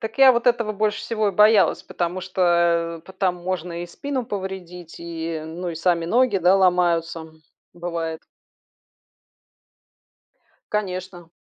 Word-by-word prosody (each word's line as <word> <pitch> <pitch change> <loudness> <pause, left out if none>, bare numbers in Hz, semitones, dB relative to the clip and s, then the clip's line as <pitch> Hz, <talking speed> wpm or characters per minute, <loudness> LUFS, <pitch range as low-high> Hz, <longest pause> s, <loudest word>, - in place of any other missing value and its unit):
Так 225 +4 -6
я 265 -1 +8
вот 235 +1 -1
этого 235 -3 +2
больше 210 +1 -1
всего 215 -3 -1
и - - -2
боялась, 210 +1 +4
потому 175 +1 -3
что, 170 -2 +1
э, - - -15
по 190 - -11
там 185 -2 0
можно 175 -1 -4
и - - -6
спину 260 +6 -4
повредить, 185 -4 -7
и, 165 -1 -4
ну 175 +2 -5
и - - -5
сами 170 0 +1
ноги, 240 +3 +2
да, 185 +2 +4
ломаются, 170 -3 +1 0.5
бывает. 170 -2 -4 2.5
Конечно. 185 -4 -4
180 Hz, 135 wpm, -23 LUFS, 170-205 Hz, 2.5 s, я